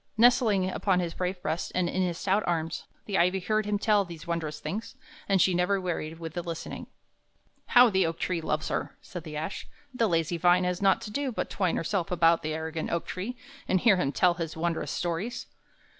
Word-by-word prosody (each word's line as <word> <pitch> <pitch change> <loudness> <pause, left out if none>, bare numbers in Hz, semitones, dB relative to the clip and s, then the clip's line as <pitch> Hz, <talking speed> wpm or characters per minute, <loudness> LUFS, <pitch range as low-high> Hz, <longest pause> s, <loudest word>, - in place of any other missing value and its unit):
Nestling 220 -5 +4
upon 185 0 +1
his 170 -2 -2
brave 180 0 -2
breast 160 +3 -2
and 180 -1 +2
in 185 - -1
his 175 -2 0
stout 195 +3 +1
arms, 165 -1 -1 0.2
the 200 -2 0
ivy 180 +2 +3
heard 215 +2 0
him 210 0 +1
tell 205 0 +3
these 170 -4 -10
wondrous 165 -3 -3
things, 220 +3 -5 0.3
and 195 -1 +4
she 185 - +4
never 180 +3 +2
wearied 165 -3 -3
with 165 -2 -7
the 175 - -2
listening. 170 -2 -6 0.8
"How 245 -2 +7
the 190 -3 +3
oak 165 0 -3
tree 180 -2 -1
loves 155 -1 -1
her!" - - -3
said 175 -4 -8
the 150 -1 -6
ash. 175 +6 -4 0.3
"The 230 -3 +1
lazy 165 0 +1
vine 175 +2 +4
has 180 +1 -1
naught 195 -1 +4
to 210 - -7
do 280 +3 -1
but 220 - -3
to - - -7
twine 185 -4 +1
herself 175 +1 -1
about 170 -1 +4
the 155 -1 -2
arrogant 160 0 -3
oak 170 - -1
tree 215 +7 -5 0.3
and 185 - +3
hear 210 -1 +5
him 140 -6 0
tell 175 +4 +3
his 165 -2 -5
wondrous 165 0 -1
stories!" 185 +8 -3
180 Hz, 215 wpm, -28 LUFS, 165-195 Hz, 0.8 s, How